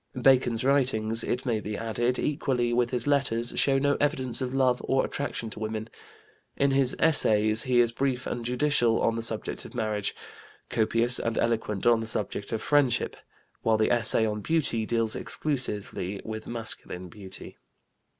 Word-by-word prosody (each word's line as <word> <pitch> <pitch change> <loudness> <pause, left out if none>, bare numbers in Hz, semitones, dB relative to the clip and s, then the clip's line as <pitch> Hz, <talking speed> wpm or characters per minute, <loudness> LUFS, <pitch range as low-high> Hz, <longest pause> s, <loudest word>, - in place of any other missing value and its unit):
Bacon's 125 -3 +3
writings, 115 -5 +1
it 125 +2 -2
may 115 -4 0
be 105 0 -5
added, 120 +2 -1
equally 130 -5 -1
with 120 0 +1
his 125 -2 -1
letters, 125 -5 0
show 135 -1 +3
no 140 +1 +1
evidence 130 -3 0
of 125 -1 -2
love 130 -2 +1
or 135 0 +1
attraction 120 -5 -4
to - - -9
women; 110 +1 -5 0.7
in 140 0 +2
his 135 -1 +3
Essays 110 -8 +4
he 125 -1 +2
is 120 -1 +3
brief 130 +1 -2
and 120 - -4
judicial 125 -1 +2
on 115 - +1
the 115 - -3
subject 115 -1 0
of - - -12
Marriage, 110 -3 -1 0.6
copious 115 +2 +2
and 115 -1 -2
eloquent 110 -4 -1
on 120 -1 +5
the 115 - -4
subject 105 -2 -3
of 110 -1 -3
Friendship, 145 -5 +2 0.5
while 110 -1 +2
the 110 - +1
essay 115 -2 +4
on 105 -1 -3
Beauty 125 -7 0
deals 115 -2 +1
exclusively 105 - -3
with 110 0 -6
masculine 110 -6 -3
beauty. 95 +1 -10
120 Hz, 165 wpm, -27 LUFS, 110-130 Hz, 0.7 s, on